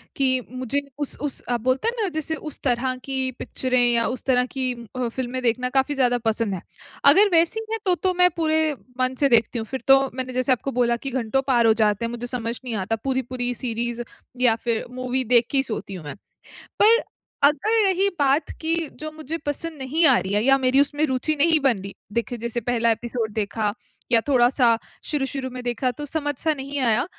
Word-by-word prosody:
कि 260 -2 +2
मुझे 255 +2 -1 0.2
उस-उस 290 -1 -3
आप 240 -2 0
बोलते 255 - 0
हैं 470 - +1
ना - - +1
जैसे 315 +1 -2
उस 305 -2 -8
तरह 255 0 0
की 265 -1 0
पिक्चरें 255 -1 0
या 230 -1 +2
उस 255 - -4
तरह 250 -2 +3
की 255 -1 -1 0.2
अ, 250 -1 -1
फ़िल्में 255 +1 -4
देखना 250 +2 +1
काफ़ी 270 +2 +1
ज़्यादा 250 -2 +2
पसंद 225 -2 +1
है। 175 - -7 0.4
अगर 390 +9 +7
वैसी 340 +6 +2
है 450 - 0
तो, 365 -2 +3
तो 370 +1 0
मैं 360 0 +4
पूरे 315 -1 +1 0.3
मन 255 0 +1
से 280 - +3
देखती 235 0 +2
हूँ। 220 - -4
फिर 265 +2 -5
तो 270 0 +7
मैंने 255 0 -4
जैसे 255 +2 0
आपको 255 +2 0
बोला 240 -2 +1
कि 270 - -1
घंटों 255 +1 0
पार 240 -3 +3
हो 220 - +6
जाते 210 +2 +1
हैं, - - -3
मुझे 240 0 -5
समझ 235 -2 -3
नहीं 245 -3 -3
आता 205 +2 -1
पूरी-पूरी 255 -2 -2
सीरीज 240 -1 -3 0.4
या 240 -3 +5
फिर 230 -2 -1
मूवी 255 +1 -2
देख 240 -1 +4
के 280 - +2
ही 270 - +4
सोती 215 -5 -5
हूँ 170 -5 -8
मैं। 145 - -6 0.7
पर, 455 +3 +6 0.4
अगर 425 +11 +4
रही 385 0 +3
बात 280 +2 +2
की 325 +1 +1 0.2
जो 310 0 -5
मुझे 310 +1 -6
पसंद 310 +2 -4
नहीं 310 +6 +2
आ 265 - +6
रही 190 +1 -4
है 210 +2 +2
या 270 0 +5
मेरी 260 0 +2
उसमें 290 +1 0
रुचि 265 +3 0
नहीं 315 +2 +3
बन 265 -6 +2
रही। 195 0 -8 0.2
देखिए 235 +1 -2
जैसे 235 +1 -3
पहला 235 0 +1
एपिसोड 230 -1 -3
देखा 210 0 -1 0.4
या 230 -2 +6
थोड़ा-सा 245 -3 +4 0.3
शुरू-शुरू 270 -2 -2
में 250 0 -7
देखा, 245 +1 -1
तो 295 +5 -7
समझ 290 0 -2
सा 315 -1 +1
नहीं 280 0 -5
आया। 245 +1 +3
255 Hz, 210 wpm, -23 LUFS, 235-285 Hz, 0.7 s, अगर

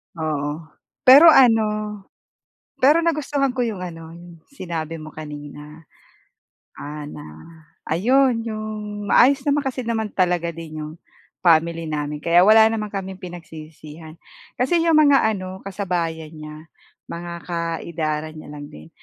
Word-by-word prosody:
Oo 155 -3 -2 0.5
pero 275 +6 +9
ano, 215 -6 +3 0.8
pero 295 +6 +5
nagustuhan 290 -4 0
ko 250 - +1
yung 210 -5 -5
ano 165 -2 -8
yung 170 0 -13
sinabi 165 - -5
mo 155 0 -9
kanina. 150 0 -10 1.0
Ah, 150 +1 -7
na 145 - -9 0.6
ayon, 245 - +2
yung 215 -1 -6
maayos 270 +3 +5
naman 290 0 +2
kasi 255 -1 -3
naman 225 -2 -2
talaga 175 -2 +1
din 155 -1 -8
yung 155 0 -7 0.5
family 165 0 +3
namin 150 0 -4
kaya 170 +1 +5
wala 220 +1 +7
naman 215 -1 -3
kaming 190 -2 -6
pinagsisihan. 160 -2 -11 0.4
Kasi 330 +8 +1
yung 330 -1 +3
mga 285 -3 +5 0.2
ano, 185 0 -7
kasabayan 175 -5 -3
niya, 155 0 -11 0.4
mga 170 0 -6
ka-edaran 165 -2 -3
niya 155 - -11
lang 145 0 -9
din. 75 +1 -13
175 Hz, 130 wpm, -21 LUFS, 155-220 Hz, 1.0 s, pero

